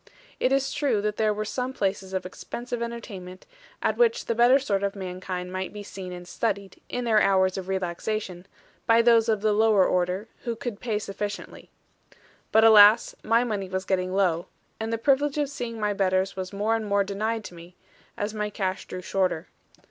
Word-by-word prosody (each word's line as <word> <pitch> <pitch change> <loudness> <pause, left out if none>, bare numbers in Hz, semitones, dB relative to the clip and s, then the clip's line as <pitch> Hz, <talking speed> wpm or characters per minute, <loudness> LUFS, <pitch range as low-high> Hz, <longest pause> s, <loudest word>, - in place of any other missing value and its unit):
It 255 - +2
is 270 0 +1
true 265 -8 +1
that 210 0 -1
there 215 -1 +2
were 210 +1 -3
some 250 +4 -3
places 195 -3 -2
of 190 -1 -3
expensive 240 +5 -6
entertainment, 195 -6 -7 0.4
at - - +1
which 475 0 +3
the - - 0
better 240 +3 +6
sort 210 -8 -1
of 200 0 -1
mankind 185 -1 -5
might 185 0 -3
be 205 0 -8
seen 190 -2 -8
and 175 0 -8
studied, 200 -2 -3
in 245 - -3
their 220 -3 +3
hours 190 -1 +3
of 190 -1 -5
relaxation, 190 0 -3 0.4
by 230 0 +5
those 230 -1 +5
of 215 -2 +1
the 215 0 +2
lower 215 -3 +4
order, 180 +4 0 0.2
who 235 -1 -2
could 230 -3 -5
pay 225 -4 -1
sufficiently. 205 0 -6 0.8
But 220 - +5
alas, 215 0 +7
my 230 +2 +3
money 205 -5 -3
was 190 0 -3
getting 185 -1 0
low; 180 -3 +1 0.3
and 220 0 -3
the 230 - 0
privilege 280 +4 +2
of 290 -2 0
seeing 230 -4 -5
my 210 -1 0
betters 190 -1 +1
was 185 -1 -5
more 210 +3 0
and 220 -2 -3
more 200 0 +2
denied 215 +3 -2
to 180 - -9
me, 170 +1 -13 0.4
as 205 +1 -2
my 210 -1 -2
cash 190 -2 -3
drew 185 - -6
shorter. 185 -3 -1
205 Hz, 195 wpm, -26 LUFS, 190-230 Hz, 0.8 s, alas